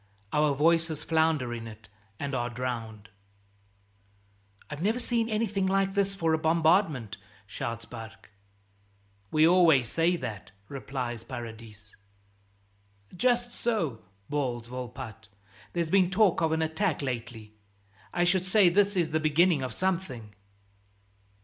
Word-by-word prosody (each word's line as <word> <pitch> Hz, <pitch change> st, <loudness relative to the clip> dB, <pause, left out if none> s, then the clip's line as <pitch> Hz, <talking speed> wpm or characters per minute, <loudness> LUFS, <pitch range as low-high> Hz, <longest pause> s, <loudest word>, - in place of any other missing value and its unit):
Our 150 Hz, -1 st, +3 dB
voices 160 Hz, +1 st, +2 dB
flounder 160 Hz, -7 st, +1 dB
in 115 Hz, -1 st, -6 dB
it 110 Hz, 0 st, -12 dB, 0.3 s
and 140 Hz, -1 st, -3 dB
are 120 Hz, -2 st, -1 dB
drowned. 115 Hz, -3 st, -5 dB, 1.6 s
"I've 150 Hz, +1 st, -7 dB
never 215 Hz, +6 st, +1 dB
seen 235 Hz, -2 st, -1 dB
anything 210 Hz, -3 st, 0 dB
like 195 Hz, 0 st, +1 dB
this 195 Hz, 0 st, +1 dB
for 165 Hz, -4 st, +1 dB
a 160 Hz, -, +2 dB
bombardment," 160 Hz, -, +2 dB, 0.3 s
shouts 115 Hz, +1 st, -5 dB
Barque. 110 Hz, -3 st, -11 dB, 1.0 s
"We 155 Hz, +6 st, +4 dB
always 165 Hz, -9 st, +5 dB
say 165 Hz, +2 st, +2 dB
that," 105 Hz, -, -6 dB
replies 130 Hz, -4 st, -5 dB
Paradis. 110 Hz, -3 st, -9 dB, 1.2 s
"Just 240 Hz, +3 st, +1 dB
so," 205 Hz, -, -2 dB, 0.3 s
bawls 130 Hz, -5 st, -2 dB
Volpatte. 125 Hz, -2 st, -8 dB, 0.5 s
"There's 170 Hz, -2 st, -1 dB
been 190 Hz, -2 st, +4 dB
talk 195 Hz, -2 st, +3 dB
of 160 Hz, -1 st, +2 dB
an 160 Hz, 0 st, +1 dB
attack 160 Hz, 0 st, -1 dB
lately; 115 Hz, -4 st, -5 dB, 0.6 s
I 175 Hz, -, +1 dB
should 175 Hz, +1 st, +2 dB
say 190 Hz, 0 st, +5 dB
this 200 Hz, +3 st, +2 dB
is 170 Hz, -3 st, +1 dB
the 155 Hz, -, +1 dB
beginning 155 Hz, +1 st, +3 dB
of 130 Hz, -2 st, -3 dB
something." 165 Hz, -, -3 dB
155 Hz, 125 wpm, -28 LUFS, 120-180 Hz, 1.6 s, always